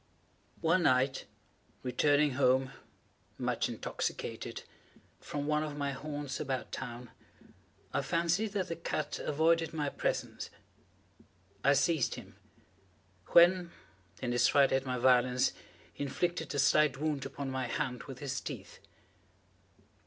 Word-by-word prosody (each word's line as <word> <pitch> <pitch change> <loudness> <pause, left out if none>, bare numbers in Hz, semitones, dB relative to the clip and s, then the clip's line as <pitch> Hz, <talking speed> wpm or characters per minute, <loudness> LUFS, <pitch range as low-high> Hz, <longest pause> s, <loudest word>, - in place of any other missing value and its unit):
One 165 +2 +3
night, 130 -2 +2 0.6
returning 145 +3 +3
home, 130 0 +2 0.7
much - - 0
intoxicated, - - -4 0.6
from 145 -1 -4
one 150 0 +1
of 150 -1 -4
my 140 -1 -1
haunts 145 0 -5
about 130 -5 -3
town, 120 -1 -6 0.8
I - - +1
fancied 175 +6 0
that 195 -3 -1
the 165 - -2
cat 150 -2 -3
avoided 165 +2 +2
my 150 -2 0
presence. - - -2 1.1
I 140 - +6
seized 140 0 +2
him; - - -11 0.9
when, 175 0 +6 0.5
in 120 - 0
his 120 +1 +4
fright 140 0 +4
at 135 0 +1
my 125 0 -1
violence, 125 0 +4 0.4
he - - -4
inflicted 165 +3 -2
a - - 0
slight 140 0 +4
wound 150 -1 -1
upon 135 0 -5
my 130 -1 -2
hand 125 +1 -3
with 135 -3 -8
his 140 0 -3
teeth. - - -8
140 Hz, 125 wpm, -32 LUFS, 130-155 Hz, 1.1 s, I